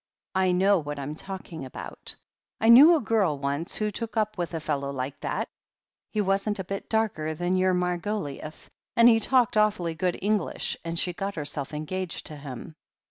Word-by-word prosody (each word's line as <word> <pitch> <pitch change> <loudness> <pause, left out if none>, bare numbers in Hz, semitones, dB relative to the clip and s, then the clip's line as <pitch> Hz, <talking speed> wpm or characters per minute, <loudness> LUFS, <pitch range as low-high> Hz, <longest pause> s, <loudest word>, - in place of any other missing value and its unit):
"I 185 -1 +3
know 190 +2 +4
what 145 -1 -5
I'm 140 +1 -4
talking 175 -2 -7
about. 130 - -5 0.4
I 225 - +3
knew 290 +9 +10
a 310 - +1
girl 205 -9 +1
once 140 +4 -2
who 210 -1 0
took 230 +2 -5
up 215 -1 +1
with 175 -2 -3
a - - -1
fellow 140 -3 -2
like 135 +1 -4
that. - - -2 0.6
He 215 - 0
wasn't 200 +1 0
a 190 - -3
bit 195 +2 -6
darker 190 -9 0
than 175 +3 0
your 185 0 +3
Margoliouth, 180 -4 -3 0.3
and 235 0 +7
he 225 -2 +6
talked 245 -2 +2
awfully 205 -6 +2
good 175 +2 -1
English, 205 -2 0
and 165 0 -3
she 180 +1 0
got 195 +3 -4
herself 145 -2 -2
engaged 165 +4 -4
to 155 - -5
him. 145 +2 -9
180 Hz, 185 wpm, -27 LUFS, 155-210 Hz, 0.6 s, knew